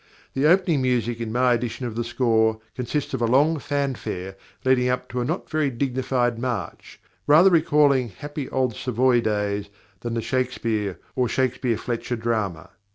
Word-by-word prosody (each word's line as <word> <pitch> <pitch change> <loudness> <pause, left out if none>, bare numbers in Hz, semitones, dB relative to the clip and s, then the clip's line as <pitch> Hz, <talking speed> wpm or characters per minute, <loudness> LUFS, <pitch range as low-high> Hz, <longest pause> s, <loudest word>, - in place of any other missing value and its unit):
The 135 +3 +2
opening 170 -4 +3
music 120 -2 0
in 115 -1 -3
my 125 +1 +3
edition 120 +1 -3
of 120 - -4
the 120 - -1
score 110 -2 +1 0.2
consists 130 +4 -3
of 130 - -2
a 115 - +2
long 145 +6 +3
fanfare 130 -10 -3 0.3
leading 125 -1 +3
up 125 0 -1
to 125 0 -2
a - - -1
not - - -3
very 155 -2 0
dignified 125 -2 -1
march, 120 -8 -5 0.3
rather 165 +6 +7
recalling 145 -6 +3
happy 145 +7 -7
old 130 -4 0
Savoy 125 0 +2
days 105 -2 -1 0.3
than 120 +1 -4
the 115 - -1
Shakespeare 115 -6 -1 0.2
or 125 -2 +1
Shakespeare 125 -2 0
Fletcher 120 +1 -3
drama. 110 -8 -2
125 Hz, 160 wpm, -24 LUFS, 115-130 Hz, 0.3 s, rather